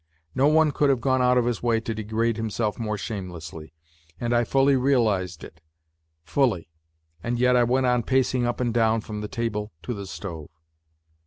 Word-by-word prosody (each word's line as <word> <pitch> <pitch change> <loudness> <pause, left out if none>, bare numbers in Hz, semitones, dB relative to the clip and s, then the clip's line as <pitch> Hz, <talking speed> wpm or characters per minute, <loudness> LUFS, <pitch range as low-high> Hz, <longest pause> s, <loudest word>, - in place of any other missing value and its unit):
No 135 +2 +3
one 155 0 +4
could 145 0 +2
have 135 -3 +2
gone 130 +1 +1
out 125 0 +4
of 120 - +3
his 120 -3 -1
way 115 -2 +2
to 115 - -3
degrade 110 +1 -1
himself 110 -1 -2
more 105 -2 -2
shamelessly, 85 -7 -7 0.4
and 120 0 -1
I 120 0 +3
fully 135 +3 +3
realized 110 - +1
it, 80 - -12 0.6
fully, 95 -10 0 0.5
and 120 +4 -2
yet 125 +1 +3
I 120 - +5
went 130 +2 +2
on 125 -1 +2
pacing 130 0 +1
up 120 - -2
and 120 -2 0
down 115 -1 +2
from 105 -1 -6
the 105 - -4
table 105 -2 -3
to 120 - -3
the 100 -3 -7
stove. 85 -6 -7
115 Hz, 185 wpm, -25 LUFS, 105-125 Hz, 0.6 s, I